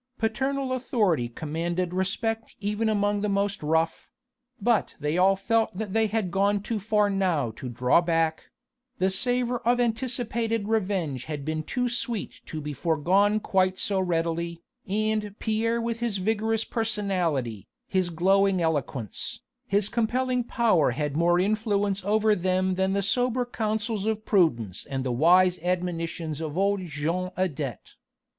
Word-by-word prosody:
Paternal 265 +4 -1
authority 205 - +1
commanded 170 +6 -3
respect 225 +4 -2
even 210 +2 0
among 205 -1 +1
the 210 - 0
most 200 +1 0
rough; 160 +2 0 0.5
but 225 0 +1
they 150 +2 -1
all 190 +2 +4
felt 225 0 0
that 210 -2 -4
they 225 0 +3
had 210 -4 -1
gone 200 +2 +2
too 220 0 -2
far 210 0 +2
now 180 - 0
to 125 +3 -7
draw 125 +6 +3
back: 165 -2 0 0.5
the 190 +1 +2
savour 245 +3 +1
of 245 +1 +1
anticipated 230 -2 -1
revenge 185 - -1
had 150 -3 -5
been 155 0 -1
too 250 +10 -1
sweet 240 -3 -3
to 155 - -5
be 150 0 -5
forgone 180 +8 +2
quite 185 -2 +1
so 195 0 +1
readily, 170 -1 -1 0.2
and 215 0 -1
Pierre 230 +1 0
with 230 0 -2
his 235 -4 -1
vigorous 220 +3 0
personality, 180 - -1 0.2
his 185 -2 0
glowing 190 +3 +3
eloquence, 145 - -2 0.3
his 200 -3 +2
compelling 250 +3 0
power 225 - +2
had 150 -2 -1
more 175 +2 +3
influence 205 -1 0
over 215 +2 +3
them 185 0 +1
than 190 +1 +1
the 200 0 +1
sober 245 +4 +1
counsels 220 -2 -2
of 220 -1 -1
prudence 120 - +1
and 135 -1 -4
the 130 - -1
wise 180 +7 +4
admonitions 165 -3 -2
of 155 0 -4
old 200 0 +2
Jean 165 +5 -2
Adet. 145 - -3
195 Hz, 145 wpm, -26 LUFS, 165-220 Hz, 0.5 s, all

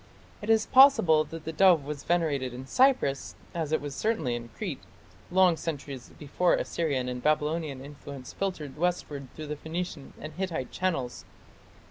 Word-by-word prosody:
It 210 - -6
is 220 -1 +4
possible 255 - +6
that 165 0 -9
the 160 - -4
dove 175 -4 +5
was 145 -1 -5
venerated 145 -7 0
in 130 +1 -7
Cyprus, 195 - +2 0.2
as 160 -3 -2
it 150 -2 0
certainly 215 - 0
was 120 - -2
in 115 - -12
Crete, - - -4 0.5
long 185 -1 +5
centuries 140 -5 -5
before 160 +5 +2
Assyrian 140 -7 -1
and 125 0 -4
Babylonian 150 -2 0
influence 140 -2 -9
filtered 160 -8 -4
westward 155 -6 -1
through 150 -1 -5
Phoenician 160 -2 -5
and 155 - -7
Hittite 170 -9 -3
channels. 160 -10 -2
155 Hz, 150 wpm, -28 LUFS, 140-175 Hz, 0.5 s, possible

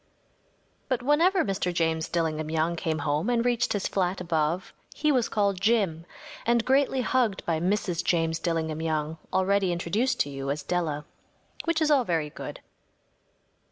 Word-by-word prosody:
But 255 -2 0
whenever 335 +7 +3
Mr. 195 -3 -1
James 160 -2 0
Dillingham 155 -2 -1
Young 160 +2 0
came 160 -1 -1
home 150 +8 0
and 240 -1 +1
reached 240 -1 +1
his 205 -2 -1
flat 185 -1 0
above 165 0 -1 0.2
he 305 0 +2
was 250 -5 +2
called 200 -3 0
‚ÄúJim‚ÄĚ 195 -7 +1 0.4
and 235 -1 +2
greatly 270 0 +3
hugged 240 -6 0
by 165 -2 0
Mrs. 180 -1 0
James 165 -2 +1
Dillingham 160 -2 -1
Young, 155 0 -2
already 190 0 +2
introduced 200 +9 0
to 145 - -1
you 135 0 -4
as 145 +1 -2
Della. 155 -3 -2 0.6
Which 335 -1 +1
is 305 - +2
all 275 -3 +5
very 160 -7 -1
good. - - -8
180 Hz, 160 wpm, -27 LUFS, 160-235 Hz, 0.6 s, all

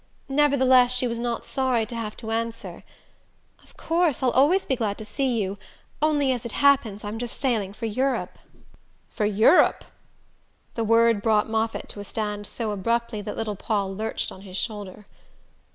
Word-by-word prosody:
Nevertheless 260 -3 +4
she 250 - +1
was 235 -1 -2
not 235 -1 -3
sorry 255 -4 0
to 235 - -8
have 220 -2 -5
to 225 -2 -6
answer: 230 +1 -4 0.8
"Of - - -23
course 330 -5 +1
I'll 250 - +3
always 305 +10 +3
be 265 - 0
glad 215 -5 -2
to 215 - -7
see 240 +2 -1
you 195 -1 -3 0.4
only, 295 -3 +2
as 245 -3 -2
it 235 - -6
happens, 265 -8 +3
I'm 210 +2 -5
just 240 0 -5
sailing 225 -8 0
for 220 +3 -6
Europe." 255 +5 -1 0.7
"For 210 - -1
Europe?" 215 - +4 0.9
The 230 - -2
word 230 -1 +4
brought 220 0 +2
Moffatt 225 0 -1
to - - -8
a - - -5
stand 205 0 -4
so 225 -3 -3
abruptly 230 +2 -1
that 205 +1 -6
little 215 -2 -2
Paul 200 -1 -2
lurched 220 +2 -3
on 190 - -11
his 190 -1 -7
shoulder. 210 -2 -5
230 Hz, 170 wpm, -25 LUFS, 210-255 Hz, 0.9 s, Nevertheless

